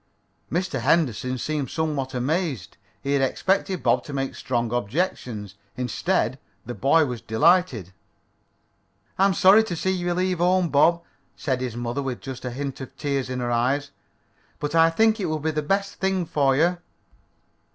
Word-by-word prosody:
Mr. 175 -4 -1
Henderson 130 -2 +1
seemed 145 +1 -2
somewhat 145 -5 -2
amazed. 135 - -2 0.3
He 140 - -2
had 140 - +2
expected 185 +7 0
Bob - - +2
to 145 - -7
make 135 -1 -2
strong 120 -2 -2
objections. 120 - -2 0.2
Instead 130 - -1 0.3
the 120 - -5
boy 150 +6 +3
was 125 -4 -5
delighted. 125 - +2 1.3
"I 195 - +6
am 195 - 0
sorry 200 +4 +6
to 185 -6 -4
see 190 +3 0
you 175 -2 -1
leave 185 -1 0
home, 180 0 +3
Bob," 170 +4 +3 0.3
said 130 -3 -2
his 125 -3 -3
mother, 120 +3 -2
with 130 -3 -4
just 130 -1 -7
the 125 - -4
hint 135 +2 -5
of 130 - -9
tears 140 -3 -2
in 125 0 -3
her 120 0 -1
eyes, 135 +5 0 0.7
"but 145 +1 -4
I 165 0 +6
think 220 +6 +3
it 190 - -1
will 155 -1 -1
be 155 +1 -1
the 150 0 -1
best 195 +6 -1
thing 190 -2 0
for 140 -4 +2
you." 170 +5 +2
145 Hz, 170 wpm, -24 LUFS, 125-175 Hz, 1.3 s, I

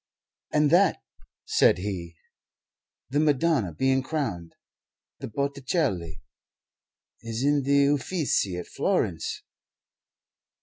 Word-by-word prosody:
"And 150 -1 +3
that," 185 +3 +4 0.5
said - - +4
he 90 -3 -5 1.0
"the 145 - +1
Madonna 150 - +2
being 130 +11 +1
crowned 115 - -4 0.6
the - - -6
Botticelli 130 - -2 1.0
is 115 +1 -4
in 145 0 +3
the 140 +1 +3
Uffizi 140 - -1
at 90 - -5
Florence. - - -1
135 Hz, 90 wpm, -26 LUFS, 95-145 Hz, 1.0 s, that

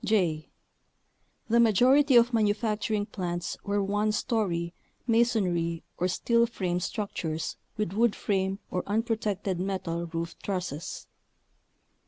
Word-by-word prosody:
j. 170 -8 +1 1.0
The 235 +1 +3
majority 255 +5 +5
of 240 +1 +6
manufacturing 210 -1 +1
plants 175 -4 -3
were 205 0 0
one 205 +2 +1
story, 185 -8 -1 0.3
masonry, 195 -9 +1 0.2
or 180 - +2
steel 235 +5 +2
frame 180 -6 -2
struc 205 +3 -3
tures 160 -1 -3 0.2
with 210 -4 -1
wood 225 +1 +3
frame 190 -1 0
or 180 - 0
unprotected 210 -3 -1
metal 180 -3 -2
roof 165 0 -4
trusses. 180 -4 -4
200 Hz, 115 wpm, -28 LUFS, 175-225 Hz, 1.0 s, of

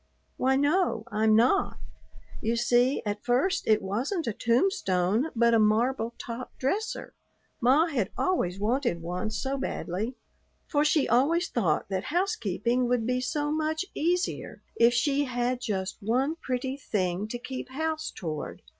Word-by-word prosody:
"Why 265 +1 +2
no, 285 - +2
I'm 215 +1 +3
not. 250 - +3 0.6
You 230 +2 0
see, 245 +3 +2
at 205 0 -3
first 275 +11 +1
it 215 -1 +3
wasn't 255 - -2
a 230 - -1
tombstone 230 - +1
but 235 0 +4
a 225 - +5
marble 230 +2 +2
top 240 +2 -7
dresser. 400 - -2 0.5
Ma 265 +7 +5
had 250 - -1
always 195 - 0
wanted 225 -5 0
one 180 +5 -3
so 270 +5 -2
badly; 215 +2 -3 0.5
for 290 -1 +1
she 300 -1 +3
always 320 +9 +2
thought 180 -11 0
that 190 -1 -2
housekeeping 245 - 0
would 240 -2 +1
be 250 +1 0
so 295 +3 -1
much 315 +3 -1
easier 350 +3 -1
if 235 +1 +5
she 285 +3 +2
had 245 0 -1
just 190 -4 -2
one 255 +9 +1
pretty 260 -1 -3
thing 190 -6 -1
to 240 - -4
keep 255 +1 -6
house 315 +3 -2
toward. 155 -4 -6
245 Hz, 145 wpm, -28 LUFS, 215-290 Hz, 0.6 s, a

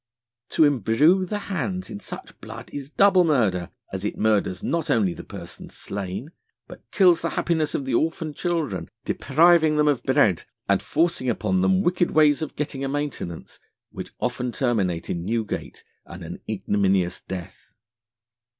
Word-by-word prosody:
To - - +3
embrew 145 - +3
the 210 - -2 0.2
hands 185 +1 -2
in 100 - -6
such - - -10
blood - - -9
is 140 -1 -6
double 195 +2 +5
Murder, 110 - +1 0.2
as 95 0 -3
it 105 - -3
murders 105 -4 +1
not 165 -2 -1
only 100 -7 +2
the - - -9
Person - - -10
slain, 100 - -6 0.4
but - - -12
kills 180 -4 +4
the 170 - -1
Happiness 160 -3 0
of 135 - -2
the 130 - -2
orphaned 155 +3 0
Children, 140 - -2 0.2
depriving 160 +2 +4
them 150 0 +3
of 145 -4 +2
Bread, - - +2 0.2
and - - +3
forcing 165 -4 0
them 120 - +2
upon 190 +1 +2
wicked 175 0 +2
Ways 150 -1 +4
of 155 - -4
getting 140 -2 -3
a 135 - -1
Maintenance, 145 - -5 0.3
which - - -7
often 125 0 -2
terminate 100 -10 0
in 85 -1 -3
Newgate 110 +2 -3 0.2
and 85 +1 -10
an 85 +1 -7
ignominious 100 -3 0
death. 95 0 -8
140 Hz, 160 wpm, -24 LUFS, 100-165 Hz, 0.4 s, double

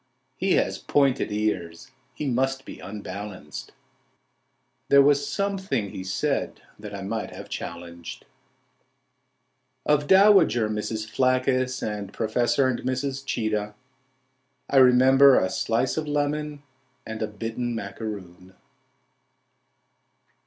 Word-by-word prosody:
"— 130 - -47 0.2
"His - - 0
pointed 140 -5 +1
ears... 105 0 -2 0.2
He 150 - -4
must 135 +1 0
be - - -9
unbalanced,"— 100 -5 -7 1.2
"There 140 - +7
was 145 0 +3
something 190 - -2
he 95 - -6
said 95 0 -2 0.2
that 105 -1 -8
I 100 - -6
might 110 +3 -3
have - - -10
challenged." 85 0 -7 1.6
Of 150 -1 +2
dowager 190 - +5
Mrs. 110 +1 -3
Phlaccus, 130 +1 +1
and 105 -2 -4
Professor 120 +4 +1
and 130 -2 -1
Mrs. 135 +1 -2
Cheetah 105 -4 -2 1.0
I 140 - +3
remember 130 +1 +7
a 95 - -1
slice 120 +5 0
of 155 -1 -2
lemon, 145 0 -2 0.4
and 110 0 -6
a 110 - 0
bitten 115 +3 -4
macaroon. 100 -4 -7
120 Hz, 110 wpm, -25 LUFS, 105-135 Hz, 1.6 s, There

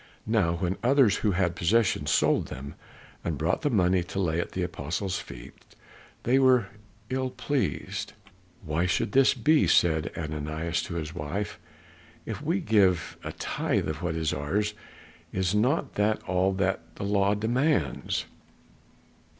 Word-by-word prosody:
Now 105 -7 +2
when 90 +2 -2
others 125 -4 +4
who 105 -3 +1
had 90 -1 +1
possessions 105 +5 +2
sold - - +3
them 70 +3 -7 0.5
and 80 -3 -2
brought 80 +4 0
the 145 - +1
money 95 -6 +3
to 95 - -4
lay 85 -3 0
at 85 - -3
the 90 - -1
apostles' 90 +3 -3
feet, - - -10 0.7
they 130 +3 +3
were 130 -6 +4 0.4
ill 130 0 0
pleased. 105 -7 -2 0.5
"Why 80 +3 0
should 95 - 0
this 135 +3 +5
be?" 150 +6 +3
said 80 -1 +3
Ananias 80 +2 -2
to 85 - -4
his 80 -2 -4
wife. 85 +5 -4 0.7
"If - - -5
we 170 +6 0
give 95 - +2
a - - -4
tithe - - -1
of 75 +1 -4
what 85 -2 -2
is 80 -1 0
ours 100 +10 -1 0.6
is 95 0 0
not 125 +9 +1
that 105 +1 +1
all 95 +1 +1
that 95 -1 0
the - - -6
law 100 0 +2
demands?" 115 - 0
95 Hz, 150 wpm, -27 LUFS, 85-110 Hz, 0.7 s, this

